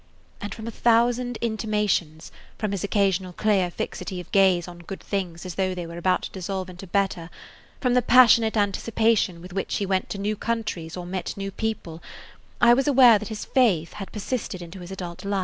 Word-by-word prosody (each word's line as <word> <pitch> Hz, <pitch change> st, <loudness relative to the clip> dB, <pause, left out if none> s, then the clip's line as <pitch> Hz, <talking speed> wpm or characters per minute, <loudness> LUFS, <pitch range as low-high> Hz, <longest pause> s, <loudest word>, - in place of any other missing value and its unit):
And 205 Hz, -, -5 dB
from 220 Hz, -, -7 dB
a 230 Hz, -, -4 dB
thousand 240 Hz, +1 st, +2 dB
intimations, 210 Hz, -8 st, -1 dB, 0.3 s
from 215 Hz, -2 st, -2 dB
his 200 Hz, -3 st, -3 dB
occasional 195 Hz, -3 st, +1 dB
clear 195 Hz, -2 st, +1 dB
fixity 185 Hz, +2 st, -5 dB
of 180 Hz, -, -10 dB
gaze 190 Hz, -3 st, +4 dB
on 175 Hz, -1 st, -10 dB
good 180 Hz, +3 st, -8 dB
things 180 Hz, -4 st, -4 dB
as 180 Hz, -, -5 dB
though 185 Hz, 0 st, -1 dB
they 175 Hz, -1 st, -5 dB
were 170 Hz, +1 st, -7 dB
about 185 Hz, +1 st, +1 dB
to -, -, -6 dB
dissolve 185 Hz, 0 st, -4 dB
into 180 Hz, +2 st, -10 dB
better, 185 Hz, -3 st, -1 dB, 0.5 s
from 250 Hz, -2 st, +1 dB
the 250 Hz, -, +4 dB
passionate 230 Hz, -2 st, +6 dB
anticipation 205 Hz, -3 st, +1 dB
with 180 Hz, 0 st, -10 dB
which 195 Hz, -, -2 dB
he 200 Hz, -, -1 dB
went 190 Hz, -1 st, -1 dB
to -, -, -4 dB
new 205 Hz, +2 st, -1 dB
countries 210 Hz, -7 st, -3 dB
or 180 Hz, -, -6 dB
met 180 Hz, +1 st, -4 dB
new 195 Hz, 0 st, -4 dB
people, 195 Hz, -7 st, -4 dB, 0.6 s
I 235 Hz, 0 st, +7 dB
was 270 Hz, +4 st, +2 dB
aware 250 Hz, -6 st, +7 dB
that 215 Hz, +1 st, -7 dB
this 215 Hz, -1 st, -5 dB
faith 195 Hz, -, +2 dB
had 195 Hz, -2 st, -8 dB
persisted 210 Hz, -2 st, -4 dB
into 175 Hz, +2 st, -9 dB
his 175 Hz, 0 st, -9 dB
adult 180 Hz, -3 st, -7 dB
life. 200 Hz, 0 st, -1 dB
195 Hz, 200 wpm, -25 LUFS, 180-220 Hz, 0.6 s, I